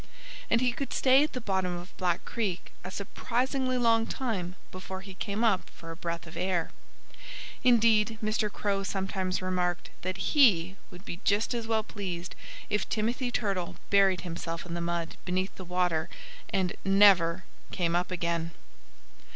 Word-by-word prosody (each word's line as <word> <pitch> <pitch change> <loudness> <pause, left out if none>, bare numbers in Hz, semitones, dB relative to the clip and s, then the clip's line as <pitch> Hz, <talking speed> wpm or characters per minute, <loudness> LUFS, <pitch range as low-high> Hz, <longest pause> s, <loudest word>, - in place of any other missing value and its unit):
And 230 - +3
he 250 -1 +3
could 275 +3 -4
stay 265 +2 +5
at 305 - -2
the 255 - -2
bottom 190 -5 -1
of 175 +2 -10
Black 175 -2 0
Creek 200 -7 -3
a 180 - -5
surprisingly 255 +6 -1
long 230 -2 +3
time 195 -10 -3 0.2
before 190 0 -6
he 195 0 -9
came 205 +3 -2
up 215 -5 +2
for 165 0 -10
a - - -7
breath 170 -1 -4
of 160 - -11
air. 175 -1 0 0.9
Indeed, 225 -3 +4
Mr. 215 -1 0
Crow 200 -1 -1
sometimes 190 -1 -2
remarked 180 -1 -1
that 185 +1 -3
he 195 - +4
would 180 0 -13
be 170 - -6
just 210 +4 +2
as 230 -2 -3
well 220 -1 +1
pleased 185 -5 -5 0.3
if 210 -1 -1
Timothy 240 +4 0
Turtle 195 -7 -1 0.2
buried 195 -3 +5
himself 170 -1 -5
in 170 - -6
the 170 - -2
mud 170 -1 -2
beneath 185 +2 -1
the 185 - -9
water 180 -2 0 0.4
and 185 -2 +1
never 190 -3 +5 0.3
came 170 -2 0
up 180 +1 +1
again! 170 -2 -2
190 Hz, 160 wpm, -29 LUFS, 175-220 Hz, 0.9 s, stay